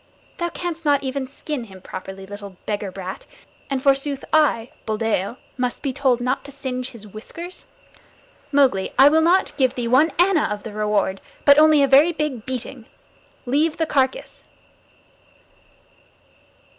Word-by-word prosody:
Thou 345 0 -1
canst 340 -1 -5
not 285 -2 +2
even 265 0 -3
skin 280 -1 -5
him 190 -3 -13
properly, 190 +1 -8
little 200 -1 -9
beggar 205 -2 -3
brat, 190 0 -7 0.4
and 270 -1 -2
forsooth 275 0 +1
I, 270 -7 +3 0.2
Buldeo, 220 0 -1 0.2
must 250 -1 -2
be 275 -3 -1
told 260 -3 +2
not 250 +2 -1
to 280 - -8
singe 260 -2 -4
his 225 -3 -11
whiskers. 330 - -7 0.8
Mowgli, 265 -10 +2
I 275 +2 +8
will 320 +2 +4
not 350 +4 +3
give 260 -2 +2
thee 240 -2 -2
one 265 +7 +4
anna 355 -2 +4
of 210 -1 -4
the 220 - -7
reward, 210 -2 0 0.2
but 285 0 +8
only 305 -2 +6
a - - +4
very 285 +6 +6
big 290 -7 -3
beating. 255 -2 -5 0.6
Leave 300 +5 +1
the 325 - +1
carcass!" 265 -4 -1
260 Hz, 150 wpm, -22 LUFS, 215-295 Hz, 0.8 s, I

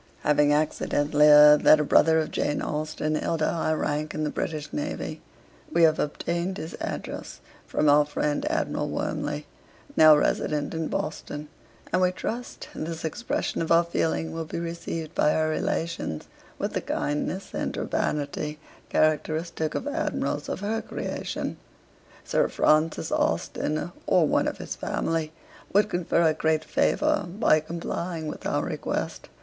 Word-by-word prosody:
'Having 150 0 +4
accidentally 150 0 +2
heard 150 0 +9
that 155 - +7
a - - +2
brother 160 +2 +5
of 155 -1 0
Jane 145 - 0
Austen 155 0 -2
held 160 +1 -1
a - - +1
high 160 -2 0
rank 150 0 -2
in 155 - -1
the 150 - -1
British 155 -2 -4
Navy, 295 0 -4 0.5
we 170 - +3
have 160 -1 +5
obtained 170 +5 -2
his 160 - -6
address - - -5 0.3
from 155 - +1
our 145 +1 +6
friend 150 - -1
Admiral 325 - -1
Wormley, - - -3 0.5
now 155 -1 +8
resident 150 0 0
in 160 -1 -2
Boston, 150 -1 -4 0.4
and 185 - +3
we 180 0 +4
trust 235 +6 -5
this 160 0 -5
expression 200 +5 -2
of 165 - -2
our 170 +1 +6
feeling 165 -1 -1
will 165 0 -4
be 155 - -6
received 165 -1 -5
by 150 - +3
her 155 0 +1
relations 160 - -2 0.3
with - - -3
the - - -1
kindness 150 +6 -2
and - - -3
urbanity 150 +1 -2 0.3
characteristic 155 +1 0
of - - -3
Admirals 285 - -2
of - - -3
her 220 +2 -1
creation. - - -4 0.7
Sir - - +1
Francis 155 +1 +2
Austen, 155 +3 -1 0.2
or 170 -4 +4
one - - +2
of - - -3
his - - -6
family, 165 -1 -2 0.4
would 210 +2 +4
confer 175 -1 +1
a 160 -1 +4
great 155 0 +1
favour 300 -3 +1
by 175 -4 +3
complying 170 +1 -4
with 150 - -5
our - - 0
request. - - -4
155 Hz, 150 wpm, -26 LUFS, 150-170 Hz, 0.7 s, heard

